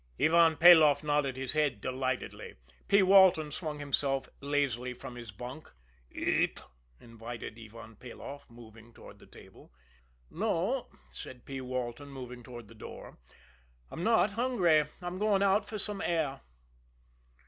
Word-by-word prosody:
Ivan 165 Hz, 0 st, +5 dB
Peloff 155 Hz, -4 st, +7 dB
nodded 145 Hz, -3 st, 0 dB
his 130 Hz, 0 st, -3 dB
head 150 Hz, -8 st, +1 dB
delightedly. 130 Hz, +2 st, -4 dB, 0.3 s
P. 200 Hz, 0 st, +5 dB
Walton 185 Hz, -5 st, +6 dB
swung 155 Hz, 0 st, -5 dB
himself 140 Hz, -2 st, -1 dB
lazily 135 Hz, -3 st, -1 dB
from 125 Hz, -, -9 dB
his 120 Hz, -2 st, -9 dB
bunk. 125 Hz, +9 st, -9 dB, 0.4 s
"Eat?" -, -, 0 dB, 0.4 s
invited 115 Hz, -1 st, -9 dB
Ivan 115 Hz, -1 st, -12 dB
Peloff, 135 Hz, +4 st, -10 dB
moving 115 Hz, -1 st, -15 dB
toward -, -, -14 dB
the -, -, -17 dB
table. -, -, -16 dB, 0.6 s
"No," -, -, -1 dB, 0.2 s
said 120 Hz, -, -10 dB
P. 135 Hz, -1 st, -6 dB
Walton, 130 Hz, +2 st, -5 dB
moving 125 Hz, -2 st, -9 dB
toward 120 Hz, -2 st, -11 dB
the 115 Hz, -, -15 dB
door. 110 Hz, -, -11 dB, 0.7 s
"I'm 170 Hz, -, -5 dB
not 220 Hz, -2 st, +3 dB
hungry; 200 Hz, -10 st, +2 dB, 0.2 s
I'm 175 Hz, +1 st, -5 dB
going 205 Hz, -2 st, +2 dB
out 200 Hz, +1 st, +2 dB
for 215 Hz, -, -4 dB
some 205 Hz, -1 st, -4 dB
air." 160 Hz, -5 st, -1 dB
140 Hz, 135 wpm, -30 LUFS, 120-170 Hz, 0.7 s, Peloff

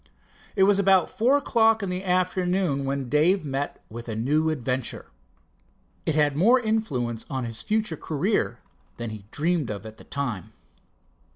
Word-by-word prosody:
It 195 Hz, -, +4 dB
was 200 Hz, 0 st, +4 dB
about 190 Hz, -3 st, +4 dB
four 250 Hz, +6 st, +3 dB
o'clock 225 Hz, -5 st, +3 dB
in 195 Hz, -, -2 dB
the 180 Hz, +1 st, -3 dB
afternoon 180 Hz, -4 st, +1 dB
when 135 Hz, -1 st, -2 dB
Dave 155 Hz, +7 st, +3 dB
met 140 Hz, 0 st, -3 dB
with 115 Hz, +1 st, -8 dB
a 110 Hz, -, -3 dB
new 150 Hz, +8 st, +1 dB
adventure. 130 Hz, -4 st, -2 dB, 1.0 s
It 160 Hz, -, +1 dB
had 145 Hz, -2 st, +3 dB
more 230 Hz, -, +5 dB
influence 145 Hz, -, -1 dB
on 130 Hz, -3 st, -2 dB
his 115 Hz, -1 st, -4 dB
future 215 Hz, -6 st, -1 dB
career 165 Hz, +10 st, -1 dB, 0.4 s
than 120 Hz, -2 st, -4 dB
he 105 Hz, -2 st, -9 dB
dreamed 160 Hz, 0 st, 0 dB
of 105 Hz, +1 st, -5 dB
at 110 Hz, 0 st, -10 dB
the -, -, -13 dB
time. 125 Hz, -, -4 dB
155 Hz, 160 wpm, -25 LUFS, 125-195 Hz, 1.0 s, more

